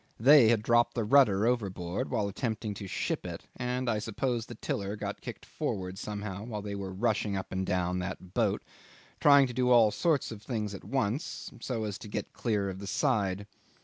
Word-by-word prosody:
They 130 Hz, -1 st, +8 dB
had 110 Hz, -2 st, +3 dB
dropped 120 Hz, +1 st, +3 dB
the 115 Hz, -, 0 dB
rudder 110 Hz, -4 st, +5 dB
overboard 95 Hz, -7 st, -1 dB
while 100 Hz, -, 0 dB
attempting 110 Hz, 0 st, -3 dB
to 100 Hz, 0 st, -7 dB
ship -, -, -2 dB
it, -, -, -6 dB
and 125 Hz, +1 st, -2 dB
I 110 Hz, -2 st, +1 dB
suppose 115 Hz, +2 st, -2 dB
the 120 Hz, -, -8 dB
tiller 100 Hz, -1 st, -3 dB
got -, -, -5 dB
kicked -, -, -8 dB
forward 95 Hz, 0 st, -4 dB
somehow 105 Hz, -2 st, -5 dB
while 110 Hz, -3 st, -5 dB
they 100 Hz, -1 st, -4 dB
were 100 Hz, -1 st, -4 dB
rushing 105 Hz, 0 st, 0 dB
up 95 Hz, -, -5 dB
and 95 Hz, 0 st, -2 dB
down 90 Hz, 0 st, 0 dB
that 90 Hz, 0 st, -6 dB
boat -, -, +1 dB, 0.6 s
trying 140 Hz, -1 st, +7 dB
to 125 Hz, -, -5 dB
do 125 Hz, 0 st, +1 dB
all 115 Hz, -4 st, +6 dB
sorts 150 Hz, -, +1 dB
of 110 Hz, -2 st, -8 dB
things 110 Hz, -3 st, -3 dB
at 100 Hz, -, -8 dB
once 135 Hz, -, -2 dB
so 115 Hz, -4 st, -3 dB
as 105 Hz, -1 st, -4 dB
to 110 Hz, -, -9 dB
get 105 Hz, -, -4 dB
clear 105 Hz, -4 st, 0 dB
of 95 Hz, -, -8 dB
the 100 Hz, -, -7 dB
side. 100 Hz, -7 st, 0 dB
105 Hz, 200 wpm, -30 LUFS, 100-120 Hz, 0.6 s, They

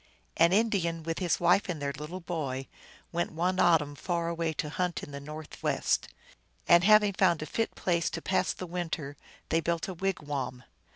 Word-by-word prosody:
An 170 Hz, +1 st, +5 dB
Indian, 185 Hz, -6 st, +1 dB
with 165 Hz, 0 st, -3 dB
his 175 Hz, -4 st, +1 dB
wife 180 Hz, +3 st, +3 dB
and 170 Hz, -4 st, -2 dB
their 140 Hz, -1 st, -2 dB
little 160 Hz, +6 st, -7 dB
boy, 140 Hz, -7 st, -3 dB, 0.4 s
went 175 Hz, 0 st, -1 dB
one 180 Hz, +3 st, 0 dB
autumn 150 Hz, -4 st, +4 dB
far 170 Hz, +3 st, -2 dB
away 165 Hz, -1 st, -1 dB
to 150 Hz, 0 st, -3 dB
hunt 180 Hz, 0 st, -2 dB
in -, -, -8 dB
the 140 Hz, -, -6 dB
northwest. 150 Hz, +2 st, -2 dB, 0.6 s
And 175 Hz, 0 st, +7 dB
having 210 Hz, 0 st, +6 dB
found 170 Hz, -5 st, +3 dB
a -, -, -4 dB
fit 225 Hz, +9 st, -2 dB
place 170 Hz, -2 st, +1 dB
to -, -, -3 dB
pass 190 Hz, -, +1 dB
the 185 Hz, -, -6 dB
winter, 165 Hz, -5 st, -4 dB, 0.3 s
they 165 Hz, -, +3 dB
built 170 Hz, 0 st, -1 dB
a 190 Hz, -, -4 dB
wigwam. 145 Hz, -9 st, -3 dB
170 Hz, 180 wpm, -29 LUFS, 155-180 Hz, 0.6 s, And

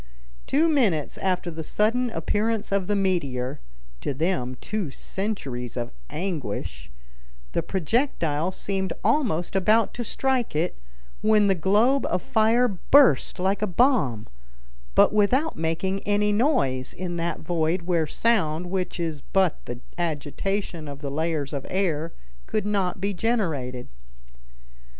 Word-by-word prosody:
Two 310 Hz, +4 st, +3 dB
minutes 215 Hz, -, +1 dB
after 180 Hz, -2 st, -1 dB
the 160 Hz, 0 st, -6 dB
sudden 230 Hz, +8 st, +1 dB
appearance 220 Hz, -1 st, -1 dB
of 195 Hz, -2 st, +1 dB
the 205 Hz, -, +1 dB
meteor 145 Hz, -11 st, -1 dB, 0.4 s
(to 140 Hz, -, -3 dB
them 130 Hz, -5 st, -1 dB
two 210 Hz, -7 st, -3 dB
centuries 135 Hz, -, -4 dB
of 120 Hz, -, -3 dB, 0.2 s
anguish) 160 Hz, -, -4 dB, 0.6 s
the -, -, 0 dB
projectile 180 Hz, -, 0 dB
seemed 190 Hz, 0 st, -2 dB
almost 205 Hz, -, +1 dB
about 215 Hz, +4 st, +3 dB
to 240 Hz, -, -3 dB
strike 255 Hz, -, 0 dB
it, 160 Hz, +4 st, 0 dB, 0.5 s
when 215 Hz, -1 st, +4 dB
the 195 Hz, -, +4 dB
globe 210 Hz, -, +3 dB
of 180 Hz, -, -1 dB
fire 240 Hz, -1 st, +3 dB
burst 200 Hz, -, +4 dB
like 190 Hz, +3 st, 0 dB
a 215 Hz, -, +1 dB
bomb, 180 Hz, -, +2 dB, 0.7 s
but -, -, +6 dB
without 250 Hz, +10 st, +2 dB
making 165 Hz, +4 st, -1 dB
any 205 Hz, +1 st, +1 dB
noise 205 Hz, -, +1 dB
in 175 Hz, -1 st, -4 dB
that 170 Hz, 0 st, -2 dB
void 165 Hz, +2 st, 0 dB
where 170 Hz, -3 st, +1 dB
sound, 175 Hz, -5 st, +1 dB
which 185 Hz, -2 st, -2 dB
is 160 Hz, -4 st, -3 dB
but 190 Hz, -4 st, +1 dB
the 120 Hz, 0 st, -6 dB, 0.2 s
agitation 170 Hz, +2 st, -2 dB
of 140 Hz, 0 st, -8 dB
the 140 Hz, -2 st, -4 dB
layers 155 Hz, -1 st, -1 dB
of 140 Hz, -2 st, -3 dB
air, 165 Hz, -4 st, 0 dB, 0.4 s
could 215 Hz, -, -1 dB
not 195 Hz, -2 st, 0 dB
be 200 Hz, +2 st, -1 dB
generated. 160 Hz, -, -1 dB
185 Hz, 135 wpm, -25 LUFS, 155-215 Hz, 0.7 s, but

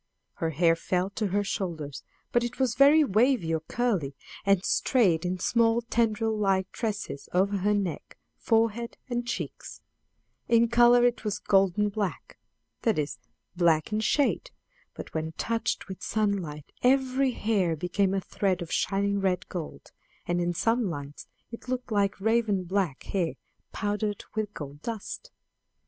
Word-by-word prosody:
Her 165 Hz, -, -1 dB
hair 165 Hz, +2 st, +3 dB
fell 180 Hz, +3 st, -1 dB
to 210 Hz, +1 st, -1 dB
her 205 Hz, +2 st, 0 dB
shoulders; 160 Hz, -8 st, -4 dB, 0.3 s
but 240 Hz, -, +2 dB
it 240 Hz, 0 st, -4 dB
was 260 Hz, -3 st, +1 dB
very 285 Hz, +4 st, +6 dB
wavy 220 Hz, -, +2 dB
or 160 Hz, -, +1 dB
curly, 175 Hz, -, -1 dB, 0.3 s
and 195 Hz, -1 st, +2 dB
strayed 185 Hz, -10 st, +2 dB
in 185 Hz, +1 st, -1 dB
small 230 Hz, +4 st, +2 dB
tendril 225 Hz, -1 st, +1 dB
like 195 Hz, -2 st, +1 dB
tresses 210 Hz, -, -4 dB
over 195 Hz, +3 st, +2 dB
her 205 Hz, +2 st, +2 dB
neck, 190 Hz, -7 st, -3 dB, 0.2 s
forehead 230 Hz, +1 st, 0 dB
and 240 Hz, 0 st, -1 dB
cheeks; -, -, -5 dB, 0.6 s
in 235 Hz, 0 st, +4 dB
color 240 Hz, +1 st, +6 dB
it 245 Hz, -2 st, +1 dB
was 210 Hz, -2 st, -1 dB
golden 195 Hz, +1 st, +2 dB
black 200 Hz, -2 st, -4 dB, 0.4 s
that 225 Hz, -6 st, +1 dB
is, 150 Hz, -1 st, -2 dB, 0.4 s
black 170 Hz, +1 st, +2 dB
in 215 Hz, -, +1 dB
shade, 285 Hz, -, +1 dB, 0.5 s
but -, -, -9 dB
when 160 Hz, 0 st, -3 dB
touched 225 Hz, +4 st, -2 dB
with 190 Hz, 0 st, -8 dB
sunlight 195 Hz, -9 st, -2 dB
every 260 Hz, 0 st, +3 dB
hair 200 Hz, -8 st, +1 dB
became 190 Hz, +4 st, 0 dB
a 195 Hz, -, 0 dB
thread 185 Hz, -2 st, -1 dB
of 170 Hz, -, -10 dB
shining 200 Hz, 0 st, +1 dB
red 185 Hz, -2 st, 0 dB
gold; 170 Hz, -4 st, -7 dB, 0.3 s
and 175 Hz, 0 st, 0 dB
in 175 Hz, 0 st, 0 dB
some 225 Hz, +4 st, +1 dB
lights 145 Hz, -3 st, -7 dB, 0.2 s
it 230 Hz, -, -9 dB
looked 255 Hz, -1 st, -3 dB
like 200 Hz, -2 st, +1 dB
raven 220 Hz, -2 st, +1 dB
black 180 Hz, -6 st, -1 dB
hair 180 Hz, -4 st, -1 dB, 0.4 s
powdered 205 Hz, 0 st, -2 dB
with 215 Hz, -1 st, -2 dB
gold 145 Hz, 0 st, -8 dB
dust. 230 Hz, -, -6 dB
200 Hz, 150 wpm, -27 LUFS, 175-230 Hz, 0.6 s, very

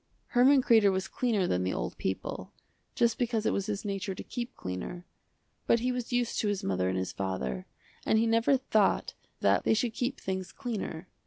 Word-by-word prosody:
Herman 260 Hz, +2 st, +5 dB
Kreder 220 Hz, -5 st, +5 dB
was 190 Hz, 0 st, -1 dB
cleaner 225 Hz, -7 st, 0 dB
than 90 Hz, -, 0 dB
the 95 Hz, -, -1 dB
old -, -, -3 dB
people, 95 Hz, -, -3 dB, 0.4 s
just 235 Hz, -1 st, +2 dB
because 230 Hz, -3 st, 0 dB
it -, -, +2 dB
was 200 Hz, +1 st, -1 dB
his 210 Hz, 0 st, -3 dB
nature 195 Hz, -1 st, -3 dB
to -, -, -7 dB
keep 245 Hz, 0 st, -5 dB
cleaner, 90 Hz, -, -5 dB, 0.6 s
but 230 Hz, -, +4 dB
he 250 Hz, +1 st, +1 dB
was 250 Hz, -1 st, -4 dB
used 245 Hz, -1 st, 0 dB
to 215 Hz, -, +1 dB
his 205 Hz, -2 st, -1 dB
mother 95 Hz, -1 st, 0 dB
and 95 Hz, -, -1 dB
his 95 Hz, 0 st, -2 dB
father, 95 Hz, -11 st, -3 dB, 0.4 s
and 220 Hz, -, +3 dB
he 225 Hz, -, +3 dB
never 230 Hz, +4 st, +3 dB
thought 215 Hz, -6 st, +1 dB, 0.3 s
that -, -, +3 dB
they -, -, +3 dB
should 225 Hz, +1 st, 0 dB
keep 250 Hz, +4 st, -2 dB
things 190 Hz, -1 st, -4 dB
cleaner. 215 Hz, -9 st, -5 dB
210 Hz, 195 wpm, -30 LUFS, 180-240 Hz, 0.6 s, Herman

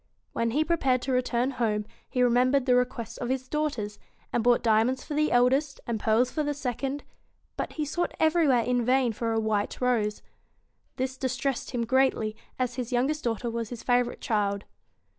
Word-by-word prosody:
When 230 Hz, -, 0 dB
he 290 Hz, +7 st, +2 dB
prepared 270 Hz, -7 st, +1 dB
to 265 Hz, -, -2 dB
return 250 Hz, 0 st, +1 dB
home, 220 Hz, -4 st, -1 dB, 0.2 s
he 255 Hz, -, 0 dB
remem 250 Hz, +1 st, +4 dB
bered 275 Hz, -2 st, +2 dB
the 255 Hz, -, +4 dB
requests 245 Hz, -2 st, 0 dB
of 240 Hz, -, -3 dB
his 260 Hz, 0 st, -2 dB
daughters, 255 Hz, -9 st, -2 dB, 0.3 s
and 235 Hz, -, +1 dB
bought 240 Hz, 0 st, +4 dB
diamonds 230 Hz, +3 st, +2 dB
for 305 Hz, -, -6 dB
the 305 Hz, +1 st, +1 dB
eldest 265 Hz, +4 st, +3 dB
and 230 Hz, -2 st, -2 dB
pearls 225 Hz, +4 st, +2 dB
for 310 Hz, -, -1 dB
the 290 Hz, -1 st, -1 dB
second; 275 Hz, +1 st, -3 dB, 0.5 s
but -, -, -4 dB
he 305 Hz, -, -2 dB
sought 345 Hz, +4 st, -2 dB
everywhere 315 Hz, -7 st, +4 dB
in 245 Hz, 0 st, +1 dB
vain 250 Hz, -1 st, +2 dB
for 230 Hz, +1 st, -2 dB
a 225 Hz, -, +1 dB
white 215 Hz, -2 st, -1 dB
rose. 230 Hz, -4 st, 0 dB, 0.7 s
This 260 Hz, 0 st, -3 dB
distressed 260 Hz, 0 st, -2 dB
him 235 Hz, -2 st, -1 dB
greatly, 260 Hz, -4 st, +2 dB, 0.2 s
as 250 Hz, -1 st, -2 dB
his 245 Hz, -1 st, -3 dB
youngest 270 Hz, +5 st, 0 dB
daughter 235 Hz, 0 st, -1 dB
was 230 Hz, -1 st, -3 dB
his 240 Hz, -2 st, -7 dB
favourite 245 Hz, -1 st, +1 dB
child. 205 Hz, -4 st, 0 dB
250 Hz, 185 wpm, -27 LUFS, 230-270 Hz, 0.7 s, remem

